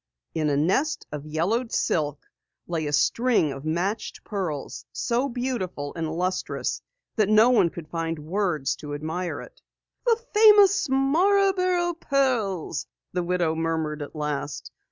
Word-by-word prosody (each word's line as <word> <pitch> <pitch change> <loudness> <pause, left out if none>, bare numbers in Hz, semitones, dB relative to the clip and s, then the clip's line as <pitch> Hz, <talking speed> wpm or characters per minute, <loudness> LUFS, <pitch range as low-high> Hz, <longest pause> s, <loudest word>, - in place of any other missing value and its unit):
In 155 -2 0
a 140 - +1
nest 195 - +1
of 150 0 -6
yellowed 200 +11 0
silk 150 -2 0 0.4
lay 165 -3 -2
a - - -2
string 220 - +2
of 135 +2 -8
matched 180 +7 -2
pearls, 180 -9 -4
so 245 +4 0
beautiful 235 - -3
and 160 -2 -3
lustrous 180 +3 -2 0.4
that 210 -2 +3
no 215 +3 +6
one 220 -8 +4
could 165 -1 -9
find 165 0 -3
words 160 -2 -1
to 145 -1 -6
admire 160 +4 -3
it. - - -14 0.5
"The 460 -1 +4
famous 410 -5 +6
Marborough 360 +5 +3
pearls," 245 - 0 0.3
the 180 - 0
widow 175 -2 0
murmured 160 -2 -2
at 145 - -7
last. 150 -2 -4
180 Hz, 135 wpm, -25 LUFS, 155-255 Hz, 0.5 s, no